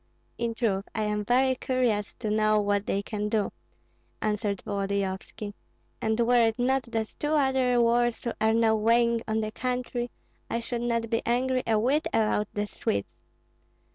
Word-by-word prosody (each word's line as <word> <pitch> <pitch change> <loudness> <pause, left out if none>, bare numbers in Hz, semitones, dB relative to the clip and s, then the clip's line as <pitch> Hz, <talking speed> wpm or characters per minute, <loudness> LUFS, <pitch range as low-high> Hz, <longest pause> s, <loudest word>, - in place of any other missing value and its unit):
"In 235 -1 -1
truth 200 -4 0
I 220 - 0
am 210 0 -1
very 260 +4 +3
curious 245 -5 0
to 215 -3 -3
know 215 0 +3
what 205 0 0
they 200 - 0
can 210 0 -3
do," 210 -2 0 0.7
answered 210 -2 -1
Volodyovski; 200 +1 -3 0.5
"and 220 +1 0
were 235 0 +4
it 225 +1 -1
not 260 +2 +2
that 220 -1 -2
two 295 +1 0
other 265 -4 +3
wars 240 0 +2 0.2
are 220 0 +4
now 225 -1 +4
weighing 230 +1 +3
on 220 0 0
the 215 0 -3
country, 250 0 -2 0.4
I 230 - -1
should 235 0 -4
not 230 -1 -1
be 230 - +1
angry 255 +2 +1
a 220 -1 +3
whit 265 +8 +2
about 215 -1 +2
the 205 0 -2
Swedes. 100 - -3
225 Hz, 165 wpm, -27 LUFS, 210-245 Hz, 0.7 s, were